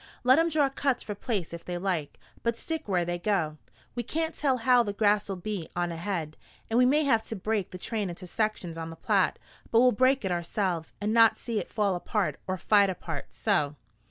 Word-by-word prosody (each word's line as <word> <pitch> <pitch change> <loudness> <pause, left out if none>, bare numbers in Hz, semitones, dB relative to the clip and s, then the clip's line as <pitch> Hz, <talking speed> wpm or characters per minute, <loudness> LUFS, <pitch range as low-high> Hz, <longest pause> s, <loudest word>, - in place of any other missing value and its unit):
Let 260 +4 +6
'em 330 +1 +3
draw 300 -3 +3
cuts 270 -1 -1
for 210 - -4
place 200 -5 -3
if 170 - -7
they 175 -1 -4
like, 175 -5 -2 0.2
but 235 0 0
stick 320 +3 -4
where 180 -3 +1
they 175 0 -2
go. 175 -6 0 0.3
We 240 - -2
can't 320 +7 -2
tell 270 -3 +1
how 250 +1 +4
the 205 -3 -2
grass 205 0 +2
will 195 - -2
be 185 -2 -5
on 175 0 0
ahead, 165 -2 -3 0.3
and 230 - +4
we 250 - +6
may 300 +4 +3
have 230 -6 +3
to 225 - -4
break 205 0 -1
the 185 - -8
train 210 +1 -3
into 175 +2 -8
sections 180 -4 -2
on 165 0 -5
the 165 - -8
Platte; - - +1 0.3
but 230 - +4
we'll 250 +1 +6
break 255 +1 +3
it 190 - 0
ourselves, 175 -1 -2
and 210 +2 -1
not 230 -1 +6
see 230 -3 -2
it - - -6
fall 205 -3 +1
apart 175 - -1
or 185 0 -1
fight 200 +2 +4
apart. 165 -5 -5
So?" 150 -9 0
205 Hz, 220 wpm, -28 LUFS, 175-235 Hz, 0.3 s, Let